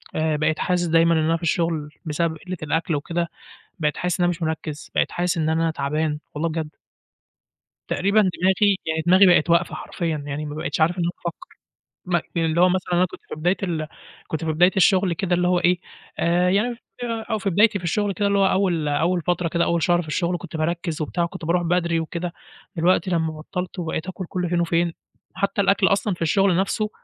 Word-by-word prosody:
آآ، 155 0 +1
بقيت 155 +1 0
حاسس 180 -1 +1
دايمًا 165 0 +4
إن 160 - +2
أنا 160 +1 +2
في 170 - -14
الشغل 165 -3 0 0.2
بسبب 160 +1 -1
قِلّة 185 -1 -4
الأكل 160 +1 0
وكده، 170 +3 -2 0.5
بقيت 150 -2 0
حاسس 180 0 -1
إن 175 - +3
أنا 175 - +3
مش 175 0 -4
مِرَكِّز، 155 -1 -4
بقيت - - +2
حاسس 175 -1 -1
إن 160 -1 +1
أنا 165 0 +1
تعبان، 150 +1 -1 0.2
والله 165 +3 -1
بجد. 160 -1 -3 1.2
تقريبًا 200 +3 +2
دماغي، 190 +1 +2
يعني 160 0 -1
دماغي 185 +2 +7
بقِت 175 -2 +4
واقفة 170 - +2
حرفيًا 160 -5 -3
يعني 145 +1 -4
ما 150 0 -6
بقيتش 155 - -3
عارف 170 +3 +3
إن 175 - 0
أنا 170 - 0
أفكّر 170 - -7 0.5
م 175 - +3 0.2
اللي 165 0 +1
هو 180 - +6
مثلًا 180 0 -1
أنا 180 +1 +4
كنت - - -12
في - - -5
بداية 175 +5 +1
ال 160 -4 -2 0.4
كنت 160 +1 -4
في 160 - 0
بداية 180 +4 +5
الشغل 190 -1 +4
كده 175 +1 0
اللي 180 0 +2
هو 180 -1 +3
إيه، 175 0 +3 0.4
آآ، 175 +2 +2
يعني 230 +5 +1 0.5
أو 220 - +1
في 200 -1 -1
بدايتي 210 +3 +4
في 180 - -11
الشغل 205 +4 0
كده 200 +3 -1
اللي 200 0 +2
هو 195 - +4
أول، 180 -6 +1
أول 165 +5 +1
فترة 175 0 0
كده 170 +1 +1
أول 170 -1 0
شهر 175 0 +3
في 155 - -12
الشغل 175 +2 -1
كنت 165 - -8
باركِّز 165 0 -2
وبتاع، 170 +3 -1
وكنت 180 0 -6
بارُوح 175 +2 +1
بدري 170 -1 +1
وكده، 170 +2 -4 0.4
دلوقتي 180 +2 +2
لمّا 160 -2 0
بطّلت 180 +4 -5
وبقيت 165 -1 -3
آكُل 185 -1 -6
كُلّ 180 -2 -2
فين 175 0 +1
وفين، 170 0 +1 0.4
حتى 200 +2 -1
الأكل 195 0 +3
أصلًا 200 0 +1
في 170 - -8
الشغل 190 +2 +3
نفسُه، 210 +3 0
170 Hz, 210 wpm, -23 LUFS, 160-185 Hz, 1.2 s, دماغي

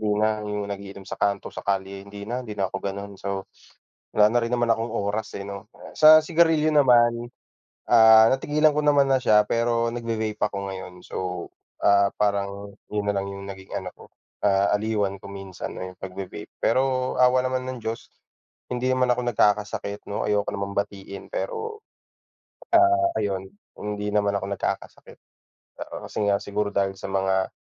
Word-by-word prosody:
hindi 105 -1 0
na 110 0 +1
'yung 105 0 -3
nag-iinom 100 -1 -7
sa - - -7
kanto, 100 -1 0
sa - - -6
kalye, 95 0 -2
hindi 100 0 -8
na 120 +4 -3
hindi 105 -3 -8
na 95 - +1
ako - - -2
gano'n. 100 +1 -5
So 100 -1 -3 0.7
wala 105 0 +5
na 120 - +3
rin 115 +1 -3
naman 120 -1 +1
akong 115 +1 +1
oras, 105 +1 -2
eh, 100 - -5
'no. 100 0 -8 0.3
Sa 155 0 +9
sigarilyo 160 -1 +3
naman, 120 -5 +4 0.6
ah, 110 -1 +8
natigilan 150 +2 +2
ko 150 - +1
naman 145 -2 +4
na 135 - +4
siya, 105 -3 +4
pero 115 0 +1
nagve-vape 110 -2 -3
ako - - -1
ngayon, 95 -1 -7
so, 90 -2 -4 0.4
ah, 100 0 +5
parang 100 -1 -1 0.2
'yun 105 -1 -2
nalang 100 -1 -1
'yung 100 0 -7
naging 95 -1 -9
ano, - - -6
ko, - - -15 0.4
ah, 100 0 +3
aliwan 105 -2 -1
ko 100 - -10
minsan 95 -2 -7
ayun 95 0 -6
pagve-vape. 95 0 -7
Pero 130 +1 +1
awa 125 0 +4
naman 130 0 -2
ng 130 - -5
Diyos 115 +1 -4 0.6
hindi 125 0 -2
naman 130 -1 +2
ako 120 0 -1
nagkakasakit 105 -1 0
'no, 100 - -2
ayoko 105 -1 +1
namang 100 0 -4
batiin, 100 -1 -4
pero, 445 -2 -4 1.2
ah, 345 0 +2
ayun, 95 -1 -2 0.3
hindi 105 0 -3
naman 100 -1 +2
ako 95 - -5
nagkakasakit. - - -5 0.6
Oo, - - -7
kasi - - -7
nga, 100 0 +3
siguro 100 +1 -2
dahil 100 -1 0
sa - - -6
mga 95 -1 +1
105 Hz, 170 wpm, -24 LUFS, 100-120 Hz, 1.2 s, Sa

